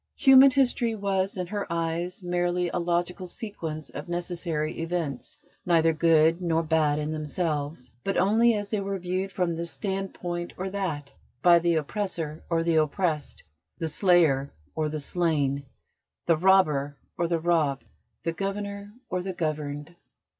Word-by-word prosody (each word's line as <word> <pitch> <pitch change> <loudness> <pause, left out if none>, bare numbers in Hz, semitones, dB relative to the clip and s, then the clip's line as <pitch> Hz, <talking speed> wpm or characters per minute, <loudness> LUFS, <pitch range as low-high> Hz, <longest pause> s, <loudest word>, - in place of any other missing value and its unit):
Human 270 0 +8
history 250 -4 +1
was 195 -2 -1
in 180 - -2
her 200 0 -4
eyes 170 +2 -2
merely 175 0 0
a 175 - -2
logical 175 +2 -1
sequence 170 - -6
of 145 - -7
necessary 170 -3 -2
events, 165 -5 -3 0.3
neither 165 -2 +3
good 165 +1 +4
nor 165 -2 +1
bad 155 -2 +2
in 150 0 -2
themselves, 150 -3 -3
but 195 - -1
only 225 +4 +4
as 205 -1 -4
they 215 - +1
were 195 0 -2
viewed 185 +2 -2
from 180 -3 0
this 170 +1 -3
standpoint 185 -3 -4
or 190 +1 -3
that, 160 -8 -3 0.3
by 175 -1 +7
the 170 0 +2
oppressor 160 -1 -3
or 165 -1 +1
the 165 -1 +2
oppressed, 155 -1 0 0.3
the 165 - -2
slayer 160 -6 +3 0.2
or 155 -1 -1
the 155 0 -3
slain, 145 -4 0 0.6
the 165 - +4
robber 155 -6 +3 0.2
or 170 - 0
the 170 -1 0
robbed, 160 -5 +1 0.4
the 165 - -1
governor 200 +2 -4
or 180 - -2
the 190 +1 -4
governed. 150 -1 -3
170 Hz, 150 wpm, -27 LUFS, 155-190 Hz, 0.6 s, Human